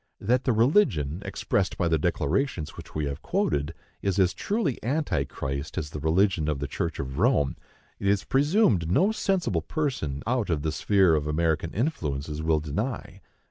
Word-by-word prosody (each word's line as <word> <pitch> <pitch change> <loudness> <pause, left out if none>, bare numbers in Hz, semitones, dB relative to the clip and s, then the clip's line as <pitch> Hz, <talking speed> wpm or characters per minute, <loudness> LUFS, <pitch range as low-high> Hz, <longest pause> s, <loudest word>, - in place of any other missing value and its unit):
That 125 +5 +1
the 130 - +3
religion 110 - +2
expressed 95 -2 -1
by 85 - +1
the 80 -2 +2
declarations 85 - -1
which - - -11
we 75 -1 0
have 70 -1 -4
quoted 75 +2 -1 0.3
is 100 -1 0
as 95 -2 +3
truly 200 - -2
Antichrist 75 - -2
as 75 -1 -3
the 75 - -5
religion 80 +1 +2
of 75 - 0
the 70 - -3
Church 80 +2 -3
of 65 +2 -4
Rome, 105 - +2 0.4
it 100 - -2
is 100 -1 +2
presumed 135 - +2
no 190 - +4
sensible 195 -4 0
person 100 - -2
out 120 -2 0
of 75 -4 0
the 80 - 0
sphere 95 +4 +3
of 75 -1 0
American 80 +1 0
influences 75 - -2
will 80 -1 +2
deny. 100 - -4
85 Hz, 170 wpm, -26 LUFS, 75-120 Hz, 0.4 s, no